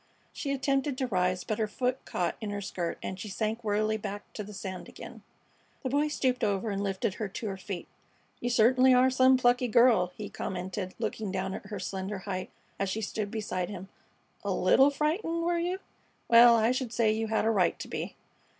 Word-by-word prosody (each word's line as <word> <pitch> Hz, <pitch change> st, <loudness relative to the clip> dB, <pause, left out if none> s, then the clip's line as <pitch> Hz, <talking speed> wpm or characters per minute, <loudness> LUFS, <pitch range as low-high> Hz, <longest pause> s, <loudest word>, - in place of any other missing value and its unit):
She 280 Hz, -, -3 dB
attempted 275 Hz, 0 st, 0 dB
to 260 Hz, -, 0 dB
rise, 185 Hz, -5 st, 0 dB
but 215 Hz, -, -3 dB
her 215 Hz, -, +1 dB
foot 250 Hz, +4 st, -2 dB
caught 175 Hz, -, -1 dB
in 215 Hz, -, -3 dB
her 205 Hz, 0 st, -3 dB
skirt 180 Hz, -4 st, -3 dB
and 190 Hz, -, -4 dB
she 215 Hz, -, -6 dB
sank 220 Hz, +3 st, -2 dB
wearily 215 Hz, +1 st, +1 dB
back 205 Hz, -1 st, -7 dB
to 210 Hz, -, -5 dB
the 205 Hz, -, -10 dB
sand 190 Hz, -2 st, -6 dB
again. -, -, -10 dB, 0.6 s
The 260 Hz, -, -2 dB
Boy 290 Hz, +2 st, +2 dB
stooped 255 Hz, -4 st, 0 dB
over 205 Hz, +1 st, 0 dB
and 200 Hz, 0 st, -2 dB
lifted 195 Hz, 0 st, -1 dB
her 215 Hz, +1 st, -3 dB
to 205 Hz, +3 st, -5 dB
her 195 Hz, -, -3 dB
feet. 190 Hz, -2 st, -6 dB, 0.5 s
"You 245 Hz, -, -2 dB
certainly 255 Hz, +2 st, +5 dB
are 255 Hz, +1 st, +5 dB
some 260 Hz, 0 st, +5 dB
plucky 245 Hz, 0 st, +3 dB
girl!" 225 Hz, -6 st, +4 dB
he 210 Hz, -, -5 dB
commented, 185 Hz, +1 st, -4 dB
looking 215 Hz, -3 st, -3 dB
down 190 Hz, 0 st, -2 dB
at -, -, -7 dB
her 205 Hz, -2 st, -5 dB
slender 190 Hz, +2 st, -4 dB
height 185 Hz, -1 st, -4 dB, 0.3 s
as 195 Hz, -, 0 dB
she 220 Hz, +4 st, -2 dB
stood 210 Hz, 0 st, -3 dB
beside 205 Hz, -5 st, -3 dB
him. 195 Hz, -1 st, -7 dB, 0.5 s
"A -, -, -2 dB
'little 270 Hz, +2 st, +5 dB
frightened,' 325 Hz, +4 st, -1 dB
were 345 Hz, 0 st, +1 dB
you? 355 Hz, +2 st, -1 dB, 0.5 s
Well, 235 Hz, 0 st, +8 dB
I 225 Hz, +1 st, +3 dB
should 255 Hz, -2 st, -2 dB
say 230 Hz, -2 st, +2 dB
you 220 Hz, +1 st, -1 dB
had 220 Hz, 0 st, +1 dB
a 225 Hz, -, +3 dB
right 190 Hz, -5 st, +2 dB
to -, -, -7 dB
be." -, -, -5 dB
215 Hz, 205 wpm, -29 LUFS, 195-255 Hz, 0.6 s, Well